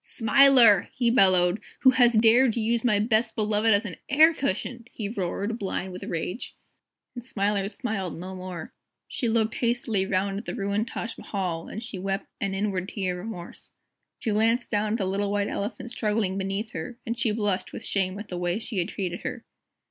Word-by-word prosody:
"SMILER!" 245 -4 +5
he 240 -3 +1
bellowed, 185 -3 +5 0.2
"who 260 - +7
has 245 -2 +5
dared 230 +2 +5
to 235 - -2
use 230 +1 0
my 225 -4 +3
Best 220 +1 +1
Beloved 215 +1 +2
as 205 +2 +3
an 185 - -6
air 310 +4 +6
cushion!" 235 -2 -3
he 215 - -4
roared, 205 +2 -3
blind 190 -1 -3
with 180 - -7
rage. 175 +7 -4 0.6
And 245 - -8
Smiler 200 -4 0
smiled 210 -8 -4
no 185 +3 -7
more. 185 -3 -7 0.3
She 240 - -1
looked 225 0 +1
hastily 230 -6 0
round 195 +1 0
at 215 - -10
the - - -4
ruined 200 +1 -1
Taj 230 0 -5
Mahal, 180 -5 -3
and 220 - -6
she 195 - -6
wept 195 +2 -2
an 195 -2 -2
inward 195 -2 -2
tear 185 -3 -3
of 195 - -7
remorse. 175 -6 -9 0.4
She 220 - -2
glanced 225 +3 +1
down 210 0 0
at - - +1
the 195 - -1
little 200 +2 -1
White 205 0 0
Elephant 230 +4 -4
struggling 210 -4 0
beneath 195 +3 -3
her, 245 -1 -6
and 230 - -2
she 235 -2 +1
blushed 205 -3 -1
with - - -7
shame 190 -1 0
at 210 +1 -7
the 180 - -4
way 175 +1 0
she 220 -2 -3
had 175 +3 -1
treated 180 -4 -4
her. 250 -2 -5
210 Hz, 195 wpm, -26 LUFS, 190-230 Hz, 0.6 s, who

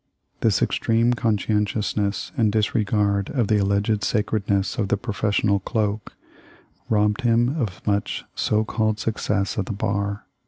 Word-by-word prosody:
This - - +2
extreme 115 +2 +2
conscien 105 -2 +1
tiousness 105 -1 -2
and 110 -6 +2
disregard 105 -2 +1
of 120 -7 0
the 105 -1 +3
alleged 100 +2 +1
sacredness 105 -1 0
of 105 - +1
the 100 - +1
professional 100 -1 0
cloak 105 0 -2 0.7
robbed 105 +2 +2
him 120 +2 +2
of 100 -6 -4
much 100 -1 -1
so 110 0 +1
called 110 -1 0
success 105 -1 -1
at 95 - -2
the - - -3
bar. 100 0 -2
105 Hz, 135 wpm, -23 LUFS, 100-110 Hz, 0.7 s, the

